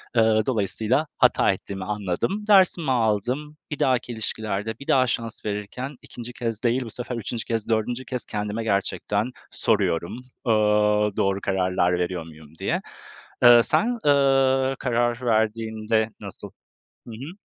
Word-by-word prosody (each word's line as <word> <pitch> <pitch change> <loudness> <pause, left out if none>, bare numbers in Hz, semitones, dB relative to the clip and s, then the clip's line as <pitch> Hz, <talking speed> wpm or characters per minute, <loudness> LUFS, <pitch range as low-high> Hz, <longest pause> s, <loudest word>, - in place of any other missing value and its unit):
Iıı, 110 -1 +4
dolayısıyla 115 +5 0
hata - - +4
ettiğimi 95 -1 -6
anladım. 105 - -2
Dersimi 185 -7 +4
aldım, 125 +6 0
bir 150 - -4
dahaki 125 -2 +1
ilişkilerde 110 -1 -3
bir 140 - -11
daha 130 -1 +4
şans 115 -1 -3
verirken 105 +7 -4
2'nci 120 0 -9
kez 115 -2 -4
değil, 125 +2 +2
bu - - -7
sefer 125 +2 -5
3'üncü 115 0 -4
kez, 115 -1 -3
4'üncü 120 +3 -1
kez, 125 0 -5
kendime 105 +1 -3
gerçekten 100 +2 -1 0.2
soruyorum, 85 +9 0 0.2
ııı, 105 -1 +3
doğru 100 0 +1
kararlar 90 -2 +1
veriyor 90 -1 -2
muyum 80 -2 -14
diye. - - -1 0.6
Iıı, 120 -1 +9
sen, 235 - +1
ııı, 135 -2 +3
karar 120 -1 0
verdiğinde 110 -1 0
nasıl? - - -9 0.6
Hı - - -8
hı. 140 - -8
115 Hz, 135 wpm, -24 LUFS, 105-130 Hz, 0.6 s, Iıı